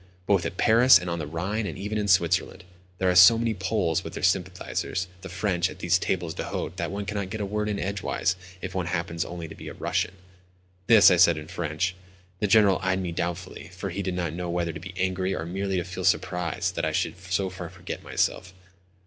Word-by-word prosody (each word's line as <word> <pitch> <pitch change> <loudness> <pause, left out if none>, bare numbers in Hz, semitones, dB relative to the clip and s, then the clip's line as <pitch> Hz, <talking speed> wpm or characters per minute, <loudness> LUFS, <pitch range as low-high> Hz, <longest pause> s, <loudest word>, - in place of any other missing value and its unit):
Both 100 -3 +2
at 95 - -8
Paris 120 +4 +7
and 90 -1 -4
on 85 - -2
the 75 - -4
Rhine, 95 +7 -2
and - - -6
even 105 +3 -3
in 105 - -1
Switzerland—there 90 0 0
are - - +1
so 90 +5 +9
many 115 -1 0
Poles, 95 -4 0
with - - -8
their - - -6
sympathisers, 90 0 -1
the 95 - -8
French, 90 -1 0
at - - -10
these 90 +1 +2
tables 85 -3 -2
d'hôte 95 - -4
that 85 -3 -2
one 100 +2 -4
cannot 100 -2 -3
get 110 - -5
a 105 - -1
word 105 +1 -2
in 105 - -1
edgeways 100 -1 -1 0.3
if 95 -1 -5
one 90 -2 -2
happens 85 -1 -2
only 85 -1 -7
to 80 - -10
be - - -10
a - - -7
Russian." 90 - -1 0.7
This 110 -4 +8
I 90 - +4
said 85 -2 +6
in 75 0 -7
French. 85 0 -2 0.5
The 105 - +1
General 100 -2 +5
eyed 95 0 0
me 90 -2 -3
doubtfully, 85 0 -4
for 95 +1 -5
he 100 - -3
did 95 -2 -3
not 85 -3 -2
know 90 0 -4
whether 85 -1 -1
to 80 - -7
be 90 +2 -9
angry 95 0 0
or 80 - -4
merely 95 +2 -2
to 90 - 0
feel 90 +1 -6
surprised 90 -4 0
that - - -2
I - - +1
should - - -1
so 95 0 -2
far 95 - -7
forget - - -7
myself. 90 -1 -1
90 Hz, 225 wpm, -26 LUFS, 85-100 Hz, 0.7 s, so